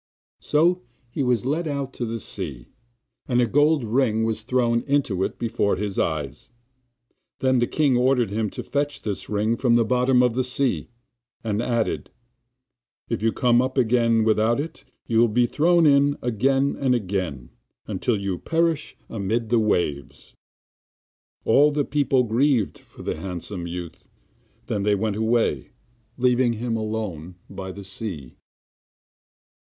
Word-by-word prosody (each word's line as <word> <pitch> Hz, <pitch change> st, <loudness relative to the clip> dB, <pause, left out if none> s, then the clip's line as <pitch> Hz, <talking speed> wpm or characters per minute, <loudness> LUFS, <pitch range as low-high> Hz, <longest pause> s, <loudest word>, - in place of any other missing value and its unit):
So 170 Hz, +4 st, +2 dB, 0.3 s
he 135 Hz, -, -3 dB
was 125 Hz, -2 st, +1 dB
led 155 Hz, +5 st, -1 dB
out 140 Hz, -2 st, -3 dB
to 120 Hz, -, -4 dB
the 115 Hz, +1 st, -4 dB
sea, 75 Hz, -, -7 dB, 0.6 s
and 120 Hz, -1 st, +2 dB
a 125 Hz, -, +4 dB
gold 145 Hz, +4 st, +3 dB
ring 110 Hz, -1 st, +1 dB
was 110 Hz, -1 st, -1 dB
thrown 120 Hz, 0 st, +1 dB
into 135 Hz, -10 st, +1 dB
it, -, -, -3 dB
before 115 Hz, -3 st, 0 dB
his 100 Hz, -1 st, -3 dB
eyes; 75 Hz, -5 st, -2 dB, 0.9 s
then 130 Hz, -1 st, +2 dB
the 120 Hz, -, +2 dB
king 145 Hz, -5 st, +2 dB
ordered 125 Hz, -3 st, +2 dB
him 110 Hz, 0 st, -1 dB
to -, -, -7 dB
fetch 145 Hz, 0 st, -2 dB
this 105 Hz, -3 st, -4 dB
ring 105 Hz, +2 st, +1 dB
up 115 Hz, -, -5 dB
from 120 Hz, -3 st, +4 dB
the 120 Hz, -1 st, +3 dB
bottom 125 Hz, +1 st, +3 dB
of 125 Hz, -2 st, +2 dB
the 130 Hz, +2 st, 0 dB
sea, 130 Hz, -1 st, -1 dB, 0.5 s
and 110 Hz, -1 st, -1 dB
added: 120 Hz, -2 st, -1 dB, 1.0 s
'If 115 Hz, -, -2 dB
you 115 Hz, +1 st, +2 dB
come 120 Hz, 0 st, +3 dB
up 130 Hz, +1 st, -3 dB
again 115 Hz, -2 st, +3 dB
without 110 Hz, +3 st, +2 dB
it 160 Hz, +3 st, -6 dB, 0.2 s
you 115 Hz, -1 st, +1 dB
will 120 Hz, -, +6 dB
be 120 Hz, +3 st, +2 dB
thrown 170 Hz, +6 st, +3 dB
in 145 Hz, 0 st, +4 dB
again 135 Hz, +4 st, +1 dB
and 130 Hz, -2 st, +2 dB
again 90 Hz, -, -3 dB, 0.3 s
until 105 Hz, +2 st, -1 dB
you 100 Hz, -2 st, -3 dB
perish 165 Hz, -1 st, -1 dB
amid 110 Hz, +2 st, -2 dB
the 120 Hz, 0 st, +3 dB
waves.' 75 Hz, -10 st, -2 dB, 1.1 s
All 145 Hz, +6 st, +5 dB
the 145 Hz, -1 st, 0 dB
people 140 Hz, -3 st, +2 dB
grieved 120 Hz, -1 st, +1 dB
for -, -, -15 dB
the -, -, -3 dB
handsome 90 Hz, +1 st, -6 dB
youth; 85 Hz, -1 st, -8 dB, 0.6 s
then 100 Hz, -, -2 dB
they 105 Hz, +1 st, +2 dB
went 105 Hz, 0 st, -1 dB
away, 110 Hz, -, +1 dB, 0.5 s
leaving 125 Hz, -1 st, +3 dB
him 115 Hz, +1 st, -2 dB
alone 105 Hz, -6 st, -4 dB
by 95 Hz, -1 st, -7 dB
the 100 Hz, +2 st, -9 dB
sea. 95 Hz, -, -7 dB
115 Hz, 155 wpm, -24 LUFS, 105-130 Hz, 1.1 s, will